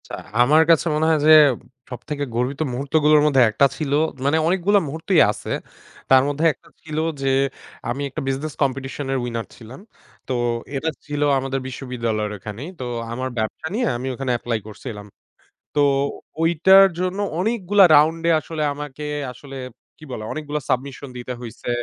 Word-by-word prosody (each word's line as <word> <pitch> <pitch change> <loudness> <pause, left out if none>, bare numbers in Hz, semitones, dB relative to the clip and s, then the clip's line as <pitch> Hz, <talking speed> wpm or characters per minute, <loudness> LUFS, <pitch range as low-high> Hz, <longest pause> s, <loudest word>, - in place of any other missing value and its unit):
আচ্ছা, - - -7 0.3
আমার 150 +6 +5
কাছে 165 -1 +5
মনে 155 +1 +1
হয় 160 -1 +3
যে - - +8 0.6
সবথেকে 145 +3 -5
গর্বিত 130 +5 -1
মুহূর্তগুলোর 150 +3 +3
মধ্যে 140 -3 +4
একটা 110 +6 +3
ছিল 150 -3 -3 0.3
মানে 145 +3 +3
অনেকগুলো 190 +3 +3
মুহূর্তই 160 +4 +2
আছে, - - -7 0.6
তার 130 -1 +6
মধ্যে 145 +3 -1
একটা - - -24
ছিল 155 -1 -7 0.2
যে 135 -1 +1 0.6
আমি 130 +4 -3
একটা 155 - -5
বিজনেস 140 +3 -2
কম্পিটিশনের 135 0 -2
উইনার 115 -2 -4
ছিলাম। 120 +3 -12 0.5
তো 130 - -2 0.4
এটা 160 +4 -1 0.2
ছিল 145 0 -4 0.2
আমাদের 135 0 -2
বিশ্ববিদ্যালয়ের 115 -5 -3
ওখানেই। 105 - -7
তো 130 - -4 0.3
আমার 130 +2 -3
ব্যবসা 110 +8 -3
নিয়ে 245 +3 0
আমি 130 +2 -5
ওখানে 130 0 -3
এপ্লাই 115 -1 -2
করছিলাম 105 -1 -8 0.7
তো 145 - +3 0.6
ওইটার 185 +4 +6
জন্য 185 +2 -2 0.2
অনেকগুলা 205 -1 +3
রাউন্ডে 165 +3 +3
আসলে 155 0 -4
আমাকে 150 0 -7 0.3
আসলে 135 +2 -11 0.4
কি - - -16
বলা 110 -3 -5
অনেকগুলো 150 -1 -4
সাবমিশন 135 +2 -2
দিতে 125 +1 -5
হইছে 120 0 -8
140 Hz, 150 wpm, -22 LUFS, 125-155 Hz, 0.7 s, যে